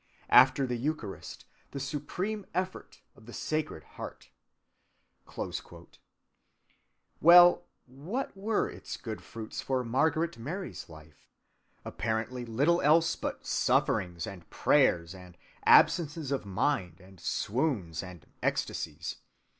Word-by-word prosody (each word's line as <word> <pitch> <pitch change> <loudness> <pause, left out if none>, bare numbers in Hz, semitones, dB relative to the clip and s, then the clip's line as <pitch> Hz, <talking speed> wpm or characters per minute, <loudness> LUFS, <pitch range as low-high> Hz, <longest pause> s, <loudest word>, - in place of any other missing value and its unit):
After 130 +2 +7
the 125 -1 -2
Eucharist, 125 -6 -5 0.2
the 140 - -6
supreme 180 +9 -4
effort 185 +1 -4
of 110 - -18
the 120 - -10
Sacred 155 - -3 1.4
Heart."(202) - - -7 1.2
Well, 175 +1 +8 0.2
what 160 - -5
were 210 +3 0
its - - -8
good 110 -3 -6
fruits 110 -1 -7
for 130 -1 -1
Margaret 155 +5 0
Mary's 175 - -6
life? 80 -1 -16 0.6
Apparently 115 +3 -3
little 140 +10 +2
else 165 +3 +4
but - - -5
sufferings 85 -2 +1
and 95 -3 -10
prayers 85 +1 +2
and 90 -2 -13 0.3
absences 155 -4 +4
of 135 -7 -2
mind 95 - -1
and 95 0 -17
swoons 100 - -1
and 90 -4 -11 0.2
ecstasies. - - -2
130 Hz, 105 wpm, -30 LUFS, 100-160 Hz, 1.4 s, Well